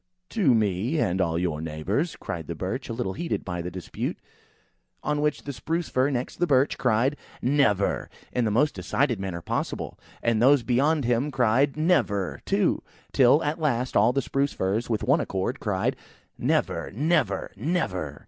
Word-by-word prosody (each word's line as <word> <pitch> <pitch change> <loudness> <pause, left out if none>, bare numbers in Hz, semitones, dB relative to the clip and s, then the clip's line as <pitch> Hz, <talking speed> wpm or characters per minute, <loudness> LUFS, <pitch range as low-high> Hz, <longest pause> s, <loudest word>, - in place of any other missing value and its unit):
"To 160 - +3
me, 110 - +1
and 95 - +1
to - - +4
all 80 0 -1
your 85 -3 -1
neighbours," 80 - -2
cried 80 -3 -6
the 85 - -4
Birch, 115 - -4
a - - -2
little 115 -5 -2
heated 170 - -3
by 90 -2 -3
the 90 - -4
dispute. 90 0 -4 0.9
On 150 0 0
which 150 0 0
the 140 - -5
Spruce 165 +8 -2
fir 130 +2 +2
next 130 -2 -3
the 175 - +1
Birch 135 -1 +3
cried 125 +4 +2 0.2
"Never!" 125 -7 +2 0.2
in 125 - +1
the 110 - +1
most 130 +8 +2
decided 130 -7 0
manner 90 -3 -4
possible; - - -3 0.2
and 115 -2 +2
those 135 0 +5
beyond 140 +4 +2
him 120 +4 +1
cried 130 +2 +2
"Never!" 100 - +1
too; - - +1 0.3
till 130 +4 +5
at 150 +2 -1
last, 125 -4 0
all - - +5
the 135 +2 0
Spruce 140 +1 0
firs, 105 +6 -1
with 110 -2 0
one 140 +6 +3
accord, 95 +8 -2
cried, 95 -4 0 0.4
"Never!" - - 0
"Never!" 135 - +1
"Never!" 95 - -2
120 Hz, 175 wpm, -26 LUFS, 95-145 Hz, 0.9 s, those